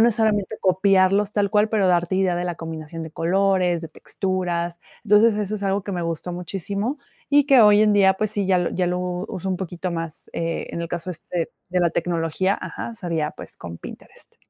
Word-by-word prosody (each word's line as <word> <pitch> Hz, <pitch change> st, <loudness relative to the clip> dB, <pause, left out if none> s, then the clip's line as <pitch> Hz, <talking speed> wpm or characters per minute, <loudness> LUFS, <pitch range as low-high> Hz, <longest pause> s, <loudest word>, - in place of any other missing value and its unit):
necesariamente, 220 Hz, -3 st, +2 dB
copiarlos 195 Hz, +2 st, +3 dB
tal 200 Hz, -2 st, +1 dB
cual, 210 Hz, +1 st, +3 dB
pero 210 Hz, -3 st, +2 dB
darte 175 Hz, 0 st, +2 dB
idea 185 Hz, -2 st, +2 dB
de 175 Hz, -, -2 dB
la 175 Hz, -1 st, -2 dB
combinación 160 Hz, 0 st, -7 dB
de 160 Hz, -, -7 dB
colores, 180 Hz, 0 st, +1 dB
de 165 Hz, -, -6 dB
texturas. 175 Hz, 0 st, -3 dB, 0.2 s
Entonces, 210 Hz, +1 st, +5 dB
eso 210 Hz, 0 st, -2 dB
es 200 Hz, -, -8 dB
algo 195 Hz, +1 st, 0 dB
que 200 Hz, -, -4 dB
me 175 Hz, -2 st, -2 dB
gustó 165 Hz, +1 st, -3 dB
muchísimo, 200 Hz, -, -3 dB, 0.3 s
y 290 Hz, 0 st, +5 dB
que 270 Hz, -4 st, +7 dB
hoy 210 Hz, -1 st, +7 dB
en 215 Hz, -1 st, +4 dB
día, 195 Hz, -2 st, +5 dB
pues, 215 Hz, +2 st, -1 dB
sí, 205 Hz, -2 st, -1 dB
ya 185 Hz, -2 st, +3 dB
lo 175 Hz, -, 0 dB
ya 180 Hz, -1 st, 0 dB
lo 180 Hz, +1 st, 0 dB
uso 180 Hz, +1 st, -4 dB
un 185 Hz, -, 0 dB
poquito 180 Hz, 0 st, -4 dB
más. 165 Hz, -2 st, -6 dB
Eh, 165 Hz, 0 st, -2 dB
en -, -, -4 dB
el 170 Hz, -, -4 dB
caso, 175 Hz, +2 st, -4 dB
este, 170 Hz, 0 st, -4 dB, 0.2 s
de 180 Hz, +1 st, +1 dB
la 170 Hz, -1 st, +3 dB
tecnología, 170 Hz, +3 st, 0 dB
ajá, 235 Hz, -, -6 dB
sería, 165 Hz, -5 st, -2 dB
pues, -, -, -11 dB
con 85 Hz, -1 st, -8 dB
Pinterest. -, -, -12 dB
185 Hz, 205 wpm, -23 LUFS, 170-200 Hz, 0.3 s, que